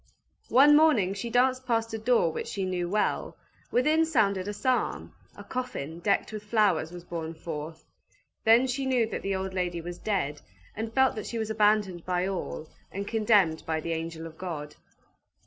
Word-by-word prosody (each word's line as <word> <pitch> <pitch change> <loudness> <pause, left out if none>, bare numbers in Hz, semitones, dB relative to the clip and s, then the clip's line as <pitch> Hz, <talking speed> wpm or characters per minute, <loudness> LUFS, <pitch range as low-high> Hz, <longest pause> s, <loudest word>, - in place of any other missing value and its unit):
One 285 +4 +7
morning 290 -12 +4
she 200 +4 -5
danced 255 +2 +2
past 230 -2 0
a 220 - -3
door 225 -7 +2
which - - -5
she 195 -2 -3 0.2
well 205 +4 0
knew. - - -14 0.4
Within 305 +6 +3
sounded 205 -11 +1
a - - -1
psalm; 255 +5 -1 0.2
a - - -10
coffin, 245 - -5
decked 200 +4 0
with 215 - -5
flowers, 205 -7 +1
was 175 -1 -9
borne 165 -2 -5
forth. 160 -1 -7 0.6
Then 230 +3 +6
she 265 +1 -2
knew 250 -3 +3
that 220 - -5
the 195 0 -1
old 190 0 -3
lady 180 -2 -1
was 175 +1 -7
dead, 165 -9 -2 0.3
and 220 +1 -4
felt 265 +2 +3
that 215 - -5
she 235 - -4
was 220 -1 -2
abandoned 210 -5 +2
by 180 0 0
all, 185 -4 -4 0.2
and 200 +1 -5
condemned 210 -8 +3
by 160 -1 0
the 165 +1 -3
angel 165 0 -5
of 160 -1 -11
God. 150 -5 -5
200 Hz, 180 wpm, -28 LUFS, 170-235 Hz, 0.6 s, One